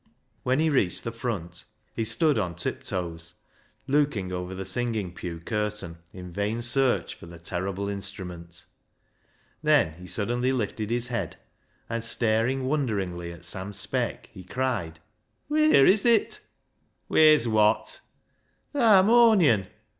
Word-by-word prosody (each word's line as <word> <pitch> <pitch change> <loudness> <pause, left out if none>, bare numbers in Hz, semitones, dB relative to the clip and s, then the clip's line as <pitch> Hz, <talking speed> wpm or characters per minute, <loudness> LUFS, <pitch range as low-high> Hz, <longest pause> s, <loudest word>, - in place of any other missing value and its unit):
When 130 +1 +1
he 160 +1 +2
reached 100 -11 +1
the 115 - -3
front 100 -8 -5 0.3
he 115 - -2
stood 150 +1 +3
on 90 -4 -2
tip - - -4
toes 85 -2 -4 0.5
looking 140 -10 0
over 90 +1 -5
the 95 +1 -5
singing 110 -2 -2
pew 85 -2 -6
curtain 105 -3 -3
in 90 -1 -10
vain 105 +4 -2
search 130 +1 +1
for - - -13
the 85 0 -11
terrible 95 +4 -3
instrument. 90 -4 -7 1.0
Then 150 - +3
he 90 - -10
suddenly 120 +6 0
lifted 110 -3 -3
his 120 +1 -1
head, 120 - -3 0.5
and 115 -1 -3
staring 115 +3 +2
wonderingly 100 - -2
at 85 0 -10
Sam 95 +3 -5
Speck, - - -2
he 95 - -10
cried 95 -7 -3 0.2
— 110 - -48
" - - -47
Wheer 305 - +5
is 200 +2 +4
it? 235 -2 +2 0.2
" - - -47
" - - -46
Wheer's 155 -6 +5
wot? 110 -1 +2 0.2
" - - -45
" - - -44
Th' - - -5
harmonion." 205 - +5
110 Hz, 150 wpm, -26 LUFS, 90-130 Hz, 1.0 s, Wheer